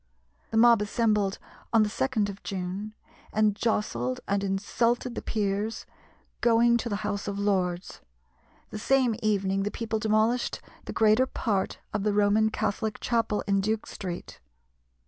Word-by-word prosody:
The 220 Hz, -, -1 dB
mob 235 Hz, -1 st, +6 dB
assembled 210 Hz, -2 st, +1 dB, 0.3 s
on 225 Hz, -2 st, +5 dB
the -, -, +1 dB
2d 220 Hz, 0 st, 0 dB
of 200 Hz, 0 st, -7 dB
June, 195 Hz, +3 st, -5 dB, 0.4 s
and 215 Hz, -1 st, +2 dB
jostled 130 Hz, -, -1 dB
and 200 Hz, 0 st, 0 dB
insulted 230 Hz, +5 st, 0 dB
the -, -, -4 dB
Peers 210 Hz, +1 st, -2 dB, 0.6 s
going 235 Hz, 0 st, +4 dB
to 235 Hz, 0 st, -3 dB
the 205 Hz, -, -1 dB
House 200 Hz, 0 st, -2 dB
of 200 Hz, -1 st, -3 dB
Lords. 185 Hz, -3 st, -1 dB, 0.7 s
The 215 Hz, -, -5 dB
same 255 Hz, -1 st, +2 dB
evening 195 Hz, -2 st, +1 dB
the 200 Hz, -, -1 dB
people 220 Hz, 0 st, -3 dB
demolished 220 Hz, +3 st, +1 dB, 0.3 s
the -, -, -5 dB
greater 220 Hz, +4 st, +4 dB
part 205 Hz, -7 st, -1 dB, 0.2 s
of 210 Hz, -, 0 dB
the 210 Hz, 0 st, +1 dB
Roman 210 Hz, +1 st, +3 dB
Catholic 215 Hz, 0 st, -2 dB
Chapel 230 Hz, -3 st, 0 dB
in 195 Hz, -1 st, +2 dB
Duke 215 Hz, +2 st, -1 dB
Street. 180 Hz, -3 st, -7 dB
210 Hz, 145 wpm, -27 LUFS, 200-225 Hz, 0.7 s, mob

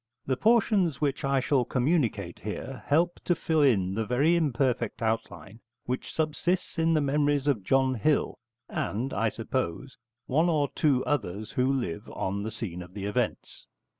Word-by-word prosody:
The 130 Hz, -, +1 dB
portions 205 Hz, -, +3 dB
which 140 Hz, -2 st, -1 dB
I 135 Hz, 0 st, +2 dB
shall 130 Hz, 0 st, +2 dB
communicate 120 Hz, -, 0 dB
here 125 Hz, +5 st, -6 dB
help 170 Hz, +4 st, +2 dB
to 175 Hz, -, +2 dB
fill 160 Hz, -2 st, +1 dB
in 100 Hz, -10 st, +3 dB
the 110 Hz, +3 st, -1 dB
very 140 Hz, +10 st, +2 dB
imperfect 130 Hz, -7 st, 0 dB
outline 110 Hz, -1 st, -3 dB, 0.3 s
which 125 Hz, +1 st, -3 dB
subsists 165 Hz, +3 st, -1 dB
in 165 Hz, 0 st, +3 dB
the 155 Hz, -, +3 dB
memories 145 Hz, 0 st, +1 dB
of 135 Hz, -9 st, +1 dB
John 130 Hz, +4 st, +2 dB
Hill 135 Hz, +6 st, 0 dB, 0.3 s
and, 120 Hz, +7 st, -3 dB
I 115 Hz, +2 st, +1 dB
suppose, 125 Hz, +1 st, -3 dB, 0.3 s
one 160 Hz, +6 st, +2 dB
or 150 Hz, -4 st, +1 dB
two 140 Hz, -5 st, +2 dB
others 110 Hz, -6 st, -2 dB
who 130 Hz, +1 st, +1 dB
live 120 Hz, -12 st, -3 dB
on 100 Hz, +1 st, -2 dB
the 110 Hz, -, -3 dB
scene 90 Hz, -6 st, -5 dB
of 90 Hz, +1 st, -12 dB
the 100 Hz, -1 st, -4 dB
events. 105 Hz, -, -3 dB
130 Hz, 165 wpm, -28 LUFS, 110-150 Hz, 0.3 s, portions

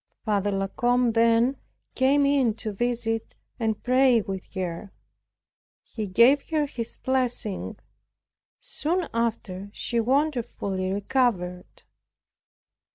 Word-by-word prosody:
Father 205 Hz, -2 st, +1 dB
La 195 Hz, -1 st, 0 dB
Combe 245 Hz, +3 st, +1 dB
then 230 Hz, +3 st, +3 dB, 0.4 s
came 275 Hz, +2 st, +3 dB
in 270 Hz, -6 st, +2 dB
to 220 Hz, -2 st, -5 dB
visit, 225 Hz, 0 st, -2 dB, 0.2 s
and 220 Hz, -2 st, -1 dB
pray 255 Hz, -1 st, +4 dB
with 195 Hz, -3 st, -6 dB
her. 185 Hz, +1 st, -4 dB, 0.9 s
He 215 Hz, -3 st, -5 dB
gave 240 Hz, +9 st, +4 dB
her 310 Hz, -2 st, +1 dB
his 235 Hz, -5 st, -5 dB
blessing; 250 Hz, -6 st, -1 dB, 0.8 s
soon 360 Hz, -7 st, -2 dB
after 215 Hz, -4 st, -2 dB
she 235 Hz, -, -2 dB
wonderfully 235 Hz, -8 st, 0 dB
recovered. 195 Hz, -4 st, -1 dB
230 Hz, 100 wpm, -25 LUFS, 205-260 Hz, 0.9 s, pray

